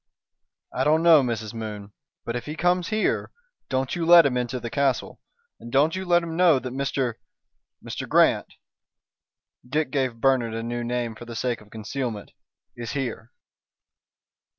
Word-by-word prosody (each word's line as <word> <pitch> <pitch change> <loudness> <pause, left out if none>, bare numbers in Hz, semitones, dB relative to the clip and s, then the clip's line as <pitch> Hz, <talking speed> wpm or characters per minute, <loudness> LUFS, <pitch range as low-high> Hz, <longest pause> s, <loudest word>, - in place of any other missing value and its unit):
"I 130 - 0
don't 155 +3 +3
know, 165 -3 +7
Mrs. 115 -4 -3
Moon. 105 -3 -7 0.3
But 115 - -3
if 120 +2 -5
he 150 - -4
comes 175 +1 +1
here, 215 0 0 0.4
don't 130 0 -1
you 170 - -2
let 170 0 +8
him 135 -3 +1
into 125 0 -2
the 115 -1 -6
castle 140 -3 -1 0.4
and 120 - -10
don't 145 +6 +3
you 190 0 -4
let 175 -1 +3
him 165 -1 -5
know 175 -4 +5
that 130 -1 -5
Mr. 135 -3 -1 0.7
Mr. - - -5
Grant" - - +3 1.1
Dick 145 +2 -1
gave 130 -4 0
Bernard 120 -3 +2
a 115 - -3
new 120 +1 -3
name 120 -1 -2
for 120 - -11
the 115 -1 -8
sake 120 0 -2
of 105 - -18
concealment 110 0 -5 0.4
"is 120 -1 -6
here." 120 -4 -4
130 Hz, 165 wpm, -25 LUFS, 115-150 Hz, 1.1 s, let